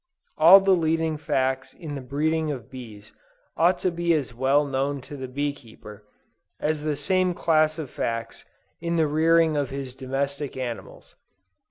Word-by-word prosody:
All 170 +5 +9
the 195 0 +2
leading 160 -1 0
facts 130 -3 -1
in 155 -4 -7
the 140 - -5
breeding 155 +4 -1
of 130 -3 -6
bees 110 -5 -11 0.4
ought 175 +2 +3
to 185 - +3
be 170 0 +1
as 135 -7 -2
well 135 +4 +2
known 140 +1 -1
to 145 - -10
the 130 -2 -6
bee 145 +3 -2
keeper, 105 -5 -14 0.5
as 155 0 -1
the 150 -1 -1
same 185 +3 +1
class 155 -2 +2
of 155 -3 -5
facts 115 -1 -4 0.4
in 170 0 -2
the 160 -2 +3
rearing 160 +1 +3
of 145 -3 -1
his 135 -2 -6
domestic 140 +2 -3
animals. 120 -3 -7
145 Hz, 165 wpm, -25 LUFS, 130-160 Hz, 0.5 s, All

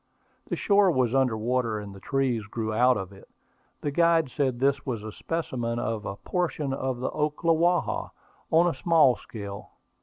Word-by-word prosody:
The - - -2
shore 200 -1 +4
was 130 -7 +1
under 130 -4 +2
water, 115 0 0
and 105 -1 -7
the 95 - -11
trees 130 -3 -1
grew 110 0 -3
out 125 +3 +4
of 95 -1 -6
it. 95 - -16 0.5
The 145 - -2
guide 165 -2 +3
said 130 -4 0
this 140 +2 +1
was 120 -6 -4
a 110 - -6
specimen 120 -6 -3
of 115 -3 -3
a 100 - -4
portion 150 - -2
of 130 -2 -2
the 125 - -2
Ocklawaha, 165 +3 +1 0.4
on 165 +2 +5
a 175 - +2
small 155 -3 +4
scale. 100 -3 -9
130 Hz, 175 wpm, -27 LUFS, 115-155 Hz, 0.5 s, on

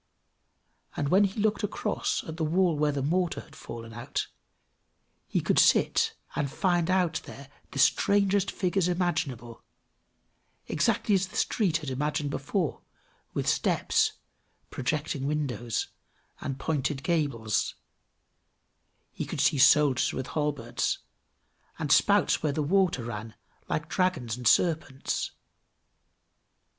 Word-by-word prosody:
And 145 -1 0
when 195 +4 +5
he 200 +2 -4
looked 210 +1 +1
across 205 - -1
at 160 0 -7
the 165 - -1
wall 170 +2 +2
where 150 0 +2
the 140 -2 -2
mortar 175 +3 0
had - - -17
fallen 115 -1 -9
out, 120 +1 -4 1.0
he - - 0
could - - +2
sit - - +4 0.2
and 140 -2 -1
find 175 -2 +1
out 180 -3 +1
there 140 0 -11 0.2
the - - -8
strangest 200 +7 +3
figures 185 -1 0
imaginable; 140 -10 -2 1.0
exactly 210 - +1
as 190 -1 +2
the - - -14
street 185 -8 +1
had 135 - -3
appeared 145 +2 -1
before, 150 +3 -2 0.5
with - - -1
steps, - - +2 0.6
projecting 140 +1 -2
windows, 125 -6 -2 0.5
and 135 -2 -4
pointed 140 -2 -2
gables; 140 - 0 1.4
he - - -5
could - - -5
see 140 - +3
soldiers 145 -1 +5
with 130 - -4
halberds, 145 -6 -1 0.8
and - - -2
spouts - - +4
where 155 - +1
the 150 - -1
water 180 -5 +2
ran, 110 -1 -6 0.3
like 155 - -1
dragons 180 - 0
and 125 -1 -2
serpents. 155 -5 +1
150 Hz, 125 wpm, -28 LUFS, 135-180 Hz, 1.4 s, when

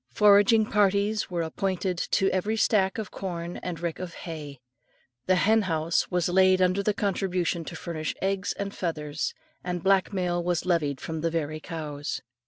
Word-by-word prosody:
Foraging 210 +1 +5
parties 205 0 +1
were 175 -2 -1
appointed 185 +2 -1
to 190 +2 +1
every 205 +4 0
stack 195 -3 +2
of 215 -3 -5
corn 175 -2 -5
and 175 -3 -5
rick 170 -1 -3
of 180 -2 -6
hay. 150 -5 -7 0.7
The 185 - +4
henhouse 180 -5 +2
was 180 -2 +1
laid 185 +1 +4
under 185 +2 +3
contribution 185 -4 -1
to 165 - -7
furnish 160 -2 -4
eggs 195 0 -1
and 200 0 -4
feathers, 150 -4 -3 0.3
and 180 -1 -3
black 195 0 +3
mail 175 -3 -1
was 175 -1 0
levied 150 -7 +1
from 160 -1 -5
the 165 - +1
very 155 -2 -2
cows. 150 -2 -5
180 Hz, 160 wpm, -27 LUFS, 165-195 Hz, 0.7 s, Foraging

